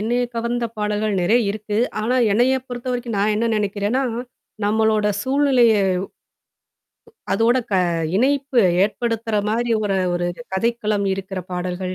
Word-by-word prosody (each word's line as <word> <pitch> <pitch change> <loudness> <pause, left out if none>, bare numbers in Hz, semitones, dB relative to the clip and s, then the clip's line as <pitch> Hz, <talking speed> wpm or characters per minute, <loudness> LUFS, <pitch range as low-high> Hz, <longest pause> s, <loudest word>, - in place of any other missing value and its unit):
என்னைய 240 +3 0
கவர்ந்த 235 +1 -1
பாடல்கள் 210 0 -1
நெறைய 215 +8 +3
இருக்கு. 210 0 -4 0.2
ஆனா 230 +4 0 0.2
என்னைய 245 +5 +3
பொறுத்தவரைக்கும் 245 -2 -4
நான் 210 +2 +2
என்ன 230 +2 0
நெனைக்கிறேன்னா, 205 +5 -1 0.6
நம்மளோட 215 0 +2 0.2
சூழ்நிலைய, 265 -3 +3 1.6
அதோட 235 +3 +3
க - - 0 0.4
இணைப்பு 270 +1 +2 0.2
ஏற்படுத்துற 225 +1 -1
மாரி 235 +2 0
ஒரு 200 -2 0 0.2
ஒரு 175 0 -1 0.3
கதைக்களம் 215 -1 0
இருக்கிற 190 -1 -5
பாடல்கள். 180 +1 -3
220 Hz, 115 wpm, -21 LUFS, 205-240 Hz, 1.6 s, நெறைய